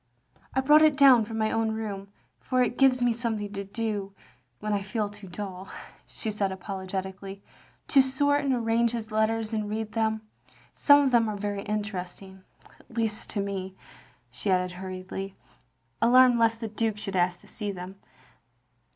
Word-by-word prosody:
I 265 - +3
brought 295 +3 +6
it 305 -3 +5
down 260 -5 +7
from 225 +1 -6
my 220 0 +1
own 225 -1 0
room, 200 -3 -5 0.3
for 255 -1 +1
it 245 - -2
gives 260 -2 +4
me 240 -1 +3
something 220 -3 -3
to 200 0 -4
do, 200 -1 -4 0.4
when 215 0 -2
I 200 - 0
feel 205 +2 -2
too 205 -1 -12
dull, 190 0 -7 0.2
" - - -23
she 220 - -5
said 200 -2 -1
apologetically, 190 +1 -6 0.5
"to 275 - +7
sort 285 +2 +1
and 275 - +1
arrange 235 -1 +1
his 225 -2 -5
letters 220 +1 0
and 215 -1 -2
read 215 0 -3
them. 220 -1 0 0.5
Some 285 -1 +6
of 270 - +2
them 230 -2 +4
are 210 - -4
very 205 0 -3
interesting, 195 -2 -5 0.4
at 235 - -17
least 220 -2 -1
to 205 - -1
me," 190 -1 -4 0.6
she 125 +11 -4
added 180 -1 +2
hurriedly, 185 +1 -6 0.7
alarmed 245 +1 +6
lest 225 0 +2
the 225 - -2
Duke 220 0 -1
should 200 -2 -4
ask 175 0 +1
to - - -18
see 210 -3 -4
them. 185 0 -8
215 Hz, 175 wpm, -27 LUFS, 195-230 Hz, 0.7 s, down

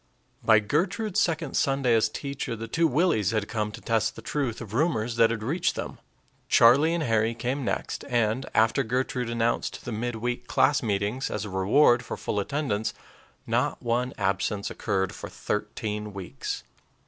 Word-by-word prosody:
By 110 - +6
Gertrude's 175 - 0
second 165 -1 0
Sunday 135 -3 +2
as 110 -1 +3
teacher, 140 -4 -4
the 115 +1 -6
two 165 +8 +2
Willies 135 - +2
had 110 -2 -1
come 105 -2 -2
to - - -10
test 110 -1 0
the 115 - -10
truth 130 -2 -2
of 110 -3 -8
rumors 120 -5 +1
that 115 -1 +6
had 115 -2 -3
reached 160 +10 0
them. - - -5 0.5
Charlie 140 +8 +6
and 170 - -1
Harry 115 -2 +1
came 130 +4 -2
next, - - -3
and, 120 +1 +1
after 110 +5 +4
Gertrude 125 0 -1
announced 115 0 -1
the 120 - -4
mid 120 +2 -2
week 120 +2 -3
class 145 -1 +3
meetings 105 +4 -1
as 105 0 -3
a 105 - -7
reward 120 +6 +4
for - - -5
full 105 - -2
attendance, 110 -2 -1 0.5
not - - 0
one 120 +2 0
absence 100 +1 -1
occurred 95 -3 -1
for - - -8
thirteen 105 0 -3
weeks. 95 -3 -5
115 Hz, 170 wpm, -27 LUFS, 105-135 Hz, 0.5 s, By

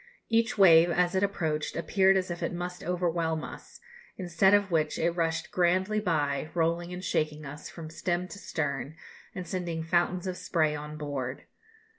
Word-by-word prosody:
Each 230 -1 +2
wave, 170 -3 +7
as 175 +1 +2
it 190 - +1
approached, 160 -6 -1
appeared 190 +2 +3
as 185 -1 -1
if 175 - -5
it - - -1
must 180 +1 -5
overwhelm 170 -2 -1
us, - - -10 0.4
instead 185 +1 +3
of 200 -2 +1
which 155 -2 +1
it 170 +1 +1
rushed 165 -2 -1
grandly 185 +4 +2
by, 155 -7 0
rolling 170 +1 0
and 180 +1 -6
shaking 155 -3 -1
us 145 +2 -8
from 160 -2 -9
stem 175 +2 -2
to 200 - -9
stern, 145 -4 -3 0.4
and 180 -2 -5
sending 170 -2 -3
fountains 175 +2 +1
of 185 -1 -3
spray 155 -3 +1
on 150 +1 -7
board. 140 -4 -4
170 Hz, 170 wpm, -29 LUFS, 155-180 Hz, 0.4 s, wave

